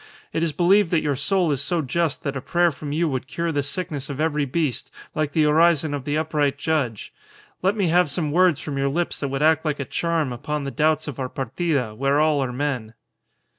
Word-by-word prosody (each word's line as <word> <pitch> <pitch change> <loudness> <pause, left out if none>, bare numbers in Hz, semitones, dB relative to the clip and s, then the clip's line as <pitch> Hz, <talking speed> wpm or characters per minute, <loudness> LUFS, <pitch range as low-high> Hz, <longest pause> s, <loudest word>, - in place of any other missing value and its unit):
It 160 - 0
is 165 -1 +1
believed 180 +5 +3
that 165 -2 +1
your 145 -2 0
soul 175 +4 +1
is 140 -2 0
so 170 +2 0
just 160 +3 -1
that 140 -1 -2
a 130 - -3
prayer 175 +4 +2
from 145 0 -7
you 165 +3 +1
would 130 -2 -3
cure 170 +3 -2
the 145 -2 0
sickness 145 -1 -4
of 140 0 -5
every 150 -2 +1
beast, 145 -1 -2 0.2
like 155 -2 -1
the 155 -2 +3
orison 160 -1 +3
of 140 -2 -4
the 145 +1 0
upright 150 -3 0
judge. 145 -8 -2 0.5
Let 190 +3 +2
me 190 -5 +1
have 175 -1 +4
some 155 -1 -1
words 175 -2 +4
from 140 -3 -4
your 140 0 +1
lips 170 +5 -1
that 140 - -2
would 135 +2 -2
act 160 0 +4
like 150 -3 -1
a 140 - -2
charm 165 -3 -1
upon 150 +4 -3
the 140 - -4
doubts 155 +1 +1
of 145 -2 -6
our 130 -1 -2
partida, 135 -2 -2
where 140 +5 +1
all 150 -2 +3
are 125 - -3
men." 125 -4 -3
150 Hz, 230 wpm, -23 LUFS, 140-165 Hz, 0.5 s, have